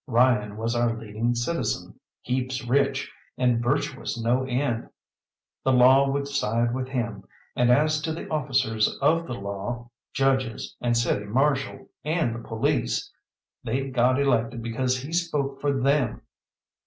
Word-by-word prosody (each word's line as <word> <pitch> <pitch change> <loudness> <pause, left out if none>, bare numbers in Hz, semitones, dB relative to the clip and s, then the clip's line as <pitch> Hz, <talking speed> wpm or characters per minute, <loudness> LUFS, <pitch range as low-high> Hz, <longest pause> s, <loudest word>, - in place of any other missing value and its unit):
Ryan 115 -4 +2
was 115 +2 -1
our 120 -1 +1
leading 115 +2 -2
citizen, 145 +8 -2 0.2
heaps 130 0 -2
rich, 135 +2 +1 0.3
and 125 -2 +2
virtuous 130 -1 -1
no 120 +3 +1
end. 125 -2 -1 0.7
The 130 - +3
Law 130 +2 +6
would 140 +1 -1
side 120 -3 0
with 130 0 -2
him, 120 -6 -3 0.3
and 125 0 +3
as 155 +4 +3
to 160 +1 -2
the 160 - -5
officers 130 -7 +1
of 165 +4 +2
the 125 - -4
law, 100 +4 -5 0.2
judges, 130 -4 0
and 120 -1 +1
City 110 -3 0
Marshal, 135 +4 0 0.2
and 155 -6 0
the 115 - -5
police 115 - -1 0.5
they'd 135 +3 -2
got 125 +2 +3
elected 120 -4 +1
because 125 +2 0
he 140 +6 -7
spoke 150 -6 -1
for 145 - +2
them. 135 -3 +1
125 Hz, 140 wpm, -25 LUFS, 115-135 Hz, 0.7 s, Law